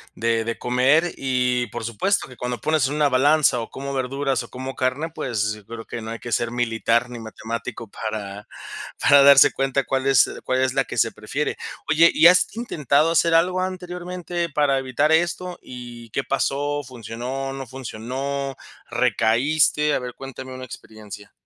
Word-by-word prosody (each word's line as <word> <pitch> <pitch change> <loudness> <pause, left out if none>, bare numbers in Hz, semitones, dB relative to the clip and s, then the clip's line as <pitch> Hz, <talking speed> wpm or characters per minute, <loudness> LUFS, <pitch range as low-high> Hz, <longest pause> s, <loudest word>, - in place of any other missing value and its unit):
de 115 0 0
de 115 0 -3
comer, 135 +8 +2
y 125 -2 0
por 110 - -6
supuesto 120 - 0
que 125 - -13
cuando 125 -1 -4
pones 155 +1 +1
en 145 - -3
una 150 -1 +3
balanza 140 0 +4
o 115 - -7
como 140 +1 -6
verduras 135 +1 -1
o - - -12
como 130 +1 -6
carne, 130 +5 -1
pues, 105 -7 -1
yo 105 -2 -12
creo 115 +1 -8
que 115 - -6
no 110 +1 -6
hay 115 - -6
que 120 - -8
ser 115 +1 0
militar 120 0 0
ni 120 -1 -7
matemático 115 +1 -6
para 105 -2 -6 0.5
para 140 -1 +6
darse 140 -1 +8
cuenta 135 0 0
cuál 135 +1 -1
es 135 -3 +5
cuál 130 0 0
es 130 -1 +1
la 135 0 +2
que - - -7
se 115 - +3
prefiere. 135 +7 -3 0.3
Oye, 165 +3 +6
¿y 165 - +7
has 180 +1 +4
intentado 155 - +1
hacer 165 0 +3
algo 180 +3 +3
anteriormente 180 -1 -4
para 145 -2 +2
evitar 135 +3 0
esto? 175 +2 +1
¿Y 120 -2 -10
qué 135 - -1
pasó? 145 +2 -1
¿Funcionó? 125 +2 -5
¿No 135 -1 -7
funcionó? 135 +3 -4 0.3
¿Recaíste? 125 +6 +2
A - - +1
ver, 125 -1 -6
cuéntame 130 -1 -8
una 130 0 -7
experiencia. 105 -4 -11
130 Hz, 175 wpm, -23 LUFS, 115-145 Hz, 0.5 s, darse